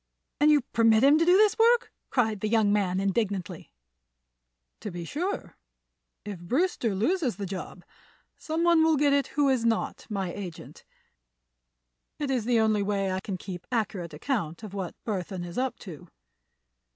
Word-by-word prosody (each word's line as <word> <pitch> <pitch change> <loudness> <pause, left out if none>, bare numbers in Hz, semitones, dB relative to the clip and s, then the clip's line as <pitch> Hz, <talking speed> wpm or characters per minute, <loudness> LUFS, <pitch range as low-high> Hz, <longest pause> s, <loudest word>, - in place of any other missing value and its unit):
"And 295 +1 +5
you 300 -1 +5
permit 225 -1 +3
him 290 +3 +6
to 330 - +3
do 355 +2 +6
this 425 +1 +3
work!" 475 +1 +4 0.2
cried 220 -5 +1
the 215 - -2
young 215 -2 +3
man, 190 -3 +1
indignantly. 195 -3 -2 1.1
"To - - -6
be 175 -2 -6
sure. 360 - -4 0.7
If 205 -4 -6
Brewster 240 - 0
loses 275 - 0
the 200 - -5
job, 185 -1 -7 0.5
some 320 +1 -3
one 340 -2 +5
will 320 -1 +3
get 285 0 +3
it 280 -1 +2
who 290 -1 +4
is 260 -4 +2
not 230 -1 -1
my 195 -4 -3
agent. 180 -5 -9 1.3
It 290 -2 -2
is 245 -5 0
the 240 -1 +3
only 215 -2 +2
way 200 -1 -1
I 185 - -1
can 190 -1 -5
keep 180 -1 -8
accurate 190 -8 -2
account 170 - -3
of 210 -3 -8
what 190 -3 -5
Burthon 185 -4 -3
is 175 +6 -5
up 260 0 -1
to." 175 -2 -10
215 Hz, 165 wpm, -27 LUFS, 190-280 Hz, 1.3 s, him